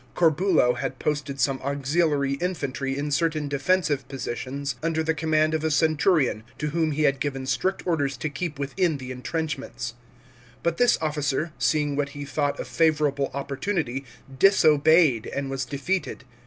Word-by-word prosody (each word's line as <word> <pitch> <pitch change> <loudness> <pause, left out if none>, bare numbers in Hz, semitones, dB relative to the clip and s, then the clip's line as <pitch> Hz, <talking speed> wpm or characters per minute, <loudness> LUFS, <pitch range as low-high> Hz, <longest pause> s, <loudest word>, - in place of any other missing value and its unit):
Corbulo 165 -5 +3
had 135 - -4
posted 145 -2 -2
some 135 0 +1
auxiliary 140 +1 +1
infantry 140 -7 -2
in 145 +1 -2
certain 155 0 0
defensive 145 -1 +1
positions 135 +1 -4
under 160 0 0
the 160 0 +1
command 155 -1 +1
o' 160 - +1
a 160 +1 -1
centurion, 155 - +2 0.2
to 150 - -2
whom 160 0 +1
he 155 +1 0
had 140 -2 +2
given 135 -2 -3
strict 185 +8 -1
orders 145 -6 0
to 140 - -2
keep 150 +1 -4
within 150 +3 0
the 130 -1 -7
entrenchments. 135 -2 -4 0.7
But 170 -1 0
this 245 0 +4
officer 150 0 -1
seeing 150 -2 +1
what 140 0 -1
he 145 - -5
thought 145 0 -1
a - - -3
favourable 150 -4 +1
opportunity, 140 -1 -2 0.4
disobeyed 155 - +5
and 140 -1 -3
was 135 -1 -2
defeated. 145 +2 -3
145 Hz, 155 wpm, -25 LUFS, 135-160 Hz, 0.7 s, disobeyed